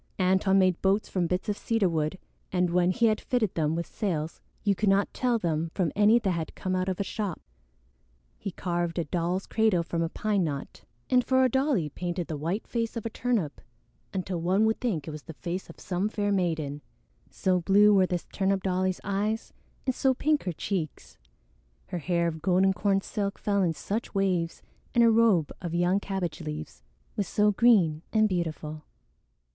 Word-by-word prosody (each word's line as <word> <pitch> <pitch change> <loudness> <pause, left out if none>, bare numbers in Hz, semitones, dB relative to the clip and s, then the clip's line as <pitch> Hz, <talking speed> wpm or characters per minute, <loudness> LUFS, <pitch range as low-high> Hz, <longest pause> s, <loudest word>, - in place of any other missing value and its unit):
Antone 190 +1 +3
made 185 -2 +3
boats 195 +2 +2
from 180 -3 0
bits 180 +2 -2
of 210 - 0
cedar 225 -2 +1
wood, 160 +1 -1 0.3
and 180 -1 +1
when 175 0 +3
he 235 +5 +2
had 215 -1 +2
fitted 235 -6 0
them 155 -1 0
with 170 0 -2
sails 165 -7 -3 0.2
you 205 - +3
could 205 +1 +1
not 195 +1 +2
tell 245 -2 +1
them 165 -4 -1
from 175 -6 +1
any 210 +3 +6
that 205 -5 0
had 165 -3 -3
come 185 0 -2
out 185 +1 0
of 185 - -3
a - - +1
shop. 200 -3 -3 1.0
He - - -4
carved 175 -2 -2
a 170 - +1
doll's 175 +4 -1
cradle 220 -6 +2
from 165 0 -2
a 165 - 0
pine 205 +1 0
knot, 145 -4 -5 0.3
and 250 -1 +5
for 260 +1 +3
a 255 - +4
dolly 265 - +1
painted 175 +3 -3
the 155 - -4
white 165 +9 -2
face 230 -1 -2
of 230 - -5
a 230 - -2
turnip 220 -13 -1 0.5
until 185 -2 -3
one 190 +5 +3
would 220 0 0
think 180 - -1
it - - -4
was 155 0 -7
the 160 0 -10
face 180 +3 -5
of - - -12
some 190 +3 -1
fair 205 -1 -1
maiden, 160 -7 -1 0.5
so 185 -1 +1
blue 205 +4 +5
were 190 -2 +4
this 175 -1 -2
turnip 195 -1 +1
dolly's 185 0 0
eyes 210 +3 -2 0.3
and 260 - +1
so 260 +1 +2
pink 300 +3 +1
her 180 - 0
cheeks, 165 -1 -4 0.7
her 180 - -3
hair 170 +1 0
of 160 -1 -4
golden 190 +2 +3
corn 195 0 +1
silk 200 0 -3
fell 200 -1 0
in 175 -3 +2
such 210 +8 -4
waves 180 -4 0 0.3
and 235 - +6
her 230 - +6
robe 220 -9 +4
of 170 -2 -4
young 175 +3 +2
cabbage 190 -5 -3
leaves 155 0 -6 0.3
was 200 -3 -1
so 210 +3 +3
green 195 -9 +4
and 215 -1 +4
beautiful. 155 -4 -3
185 Hz, 195 wpm, -28 LUFS, 170-210 Hz, 1.0 s, any